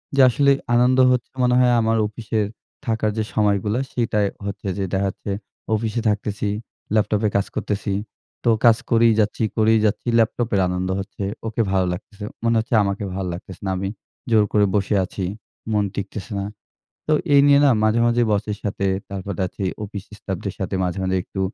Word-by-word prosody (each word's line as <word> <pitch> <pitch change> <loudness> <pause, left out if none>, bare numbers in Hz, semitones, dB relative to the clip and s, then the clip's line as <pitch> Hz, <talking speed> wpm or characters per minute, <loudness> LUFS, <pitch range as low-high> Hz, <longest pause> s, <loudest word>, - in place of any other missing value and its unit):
যে 140 - +5
আসলে 140 +3 +3 0.2
আনন্দ 125 +2 +4
হচ্ছে 125 -2 -1
মনে 125 0 +3
হয় 125 -1 +4
আমার 115 0 +2
অফিসে 110 +1 -3 0.5
থাকার 110 -2 0
যে 110 - +1
সময়গুলা 105 +1 +1
সেটাই 105 -4 +1 0.2
হচ্ছে 100 0 -5
যে 100 - -1
দেখা 95 +1 +1
যাচ্ছে 100 - -6 0.4
অফিসে 110 +1 -1
থাকতেছি, 105 0 -1 0.4
ল্যাপটপে 105 0 +2
কাজ 100 - +1
করতেছি। 100 -1 -2 0.5
তো 120 - +3 0.2
কাজ 115 -2 +7
করেই 115 -1 +5
যাচ্ছি, 105 +1 +1
করেই 110 0 +4
যাচ্ছি। 105 +3 -1
ল্যাপটপের 115 -2 +1
আনন্দ 90 +1 -2
হচ্ছে। 100 +1 -6 0.2
ওকে 110 +1 -1
ভালো 95 -1 +2
লাগতেছে। 100 +3 -9 0.2
মনে 115 0 +2
হচ্ছে 115 +2 -4
আমাকে 100 +1 -2
ভালো 95 -1 -2
লাগতেছে 90 +1 -9
না। 95 - 0
আমি 95 +1 -2 0.4
জোর 110 -2 +5
করে 105 -1 +5
বসে 100 +1 +1
আছি। 95 +1 -5 0.5
মন 105 -1 +2
টিকতেছে 100 0 -5
না। 100 - -2 0.6
তো 155 - +1 0.2
এই 140 - +8
নিয়ে 140 0 +6
না 140 - +6
মাঝে, 110 +2 +3
মাঝে 120 0 +3
বসের 105 0 -1
সাথে 100 -1 -2 0.2
তারপর 100 0 -5
দেখা - - -6
যাচ্ছে 100 - -8 0.2
অফিস 100 -1 -7
স্টাফদের 95 +1 -4
সাথে 95 0 -3
মাঝে, 90 +1 -2
মাঝে 95 0 0
একটু 95 - -6
105 Hz, 180 wpm, -22 LUFS, 100-115 Hz, 0.6 s, এই